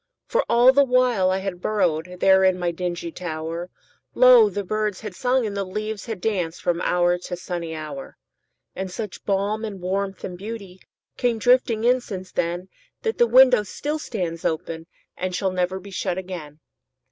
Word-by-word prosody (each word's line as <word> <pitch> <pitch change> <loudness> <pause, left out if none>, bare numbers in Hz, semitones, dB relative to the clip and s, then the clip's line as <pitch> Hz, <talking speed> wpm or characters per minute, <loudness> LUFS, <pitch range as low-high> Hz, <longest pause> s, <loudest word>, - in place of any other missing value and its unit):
For - - +1
all 245 +2 +6
the 280 +1 +6
while 250 -7 +3
I 190 - +1
had 190 -2 -4
burrowedThere 180 -1 +2
in 185 - -2
my 175 -1 -1
dingy 175 -1 -4
tower, 165 0 -5 0.5
Lo! - - +7
the 205 - -3
birds 210 0 -2
had 210 -4 -6
sung 250 +4 +1
and 205 -2 -4
the 200 - -1
leaves 210 +2 -5
had 220 -4 -4
dancedFrom 175 -4 -1
hour 175 0 +2
to 180 0 -5
sunny 175 -2 -5
hour. 150 -3 -7 0.6
And 190 0 -4
such 210 +1 -6
balm 205 +2 0
and 205 -3 -5
warmth 195 +1 -3
and 180 -1 -6
beautyCame 220 +3 -5
drifting 235 -1 +3
in 250 +1 +4
since 185 -5 -7
then, 175 +2 -2 0.4
That 450 0 -2
the 240 - +5
window 250 0 +7
still 295 +9 -4
stands 175 - -4
openAnd 160 +1 -3 0.5
shall 190 0 0
never 185 +1 -1
be 195 +1 -12
shut 180 -1 -2
again. 170 -5 -7
190 Hz, 165 wpm, -23 LUFS, 175-220 Hz, 0.6 s, Lo